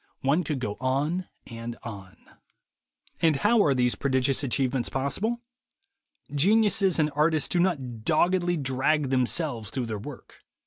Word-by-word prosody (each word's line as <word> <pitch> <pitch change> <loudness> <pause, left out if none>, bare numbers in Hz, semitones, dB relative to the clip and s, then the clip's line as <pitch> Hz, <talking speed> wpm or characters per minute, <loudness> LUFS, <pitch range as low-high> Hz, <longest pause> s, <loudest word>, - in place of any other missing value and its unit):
One 145 +7 +2
could 150 -2 -2
go 105 -5 -4
on 145 +8 -1 0.2
and 115 0 -7
on. 100 -5 -9 1.0
And 160 -3 +4
how 210 +9 +3
are 140 -3 +2
these 125 -1 +2
prodigious 130 0 0
achievements 130 -1 0
possible? 190 - -1 0.9
Geniuses 195 +3 +3
and 150 -1 +1
artists 155 0 +2
do 175 - 0
not 135 -11 -1
doggedly 175 +5 +2
drag 135 +1 0
themselves 130 -3 0
through 130 -2 -3
their 110 -2 -4
work. 135 +6 -11
140 Hz, 135 wpm, -26 LUFS, 125-170 Hz, 1.0 s, And